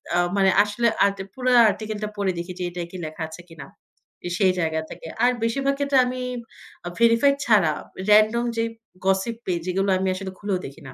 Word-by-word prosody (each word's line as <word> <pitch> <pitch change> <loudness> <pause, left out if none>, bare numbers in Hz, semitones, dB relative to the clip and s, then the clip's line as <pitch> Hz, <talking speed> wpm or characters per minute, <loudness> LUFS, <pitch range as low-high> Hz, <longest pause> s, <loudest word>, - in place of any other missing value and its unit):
আ - - +3 0.2
মানে 195 -1 +4
আসলে 210 +3 0 0.2
আট 200 0 0 0.2
পুরা 255 -1 0 0.2
আর্টিকেলটা 215 0 -4
পড়ে 200 -2 0
দেখি 175 +2 -5
যে - - -2
এটাই 175 -1 -6
কি 185 - -7
লেখা 155 +1 -6
আছে 160 +2 -10
কিনা। 165 -4 -10 0.7
সেই 190 -3 +4
জায়গা 160 -1 0
থেকে, - - -9 0.2
আর 250 - +5
বেশিরভাগ 275 +4 +1
ক্ষেত্রে 280 -1 +2
আমি 255 0 -4 0.7
আ - - -2
ভেরিফাইড 235 +5 +4
ছাড়া 195 -9 +4 0.4
রেনডম 215 +3 +5
যেই 230 0 0 0.4
গসিপ 195 +4 +1
পেজ 175 -2 -1
যেগুলো 195 +2 0
আমি 190 0 -1
আসলে 190 0 -6
খুলেও 205 -2 -1
দেখি 140 +4 -10
না। 130 - -10
200 Hz, 185 wpm, -23 LUFS, 180-230 Hz, 0.7 s, আর